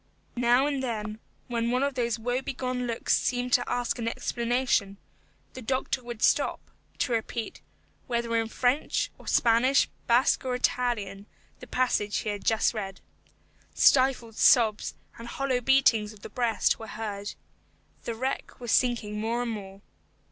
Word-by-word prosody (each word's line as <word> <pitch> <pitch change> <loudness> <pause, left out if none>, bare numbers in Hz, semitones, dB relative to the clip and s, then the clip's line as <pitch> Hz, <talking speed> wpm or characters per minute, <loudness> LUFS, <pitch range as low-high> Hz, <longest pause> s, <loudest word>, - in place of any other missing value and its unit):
Now 245 +2 +3
and 285 -2 -1
then, 215 -4 -4 0.3
when 235 -2 -1
one 250 +2 +1
of 280 0 0
those 235 -3 -1
woebegone 250 +1 -2
looks 230 -1 +1
seemed 245 0 -1
to 245 - +3
ask 245 +2 -1
an 230 - -2
explanation, 235 -4 0 0.6
the 260 - -8
doctor 260 +2 -1
would 240 -2 -6
stop, - - +3 0.4
to 255 - -1
repeat 225 0 -3 0.5
whether 235 -2 -1
in 225 0 +1
French, 250 +5 0
or - - -15
Spanish, 240 +4 +4 0.2
Basque, 240 +5 +3
or 255 -1 -1
Italian 215 -6 -1 0.3
the - - -11
passage 245 -5 0
he - - -2
had 205 -1 -4
just 225 +1 +2
read. 195 -4 -5 0.8
Stifled 255 -4 +3
sobs 220 -4 +4 0.2
and 230 - -8
hollow 260 0 -1
beatings 230 -5 +3
of 205 - -17
the - - -8
breast 235 -2 +1
were 225 - -8
heard. 210 -2 -5 0.7
The 230 - -3
wreck 260 +4 -4
was 240 -2 -4
sinking 225 -4 +1
more 230 +3 -1
and 235 - -3
more. 195 -2 -8
235 Hz, 150 wpm, -27 LUFS, 220-250 Hz, 0.8 s, Spanish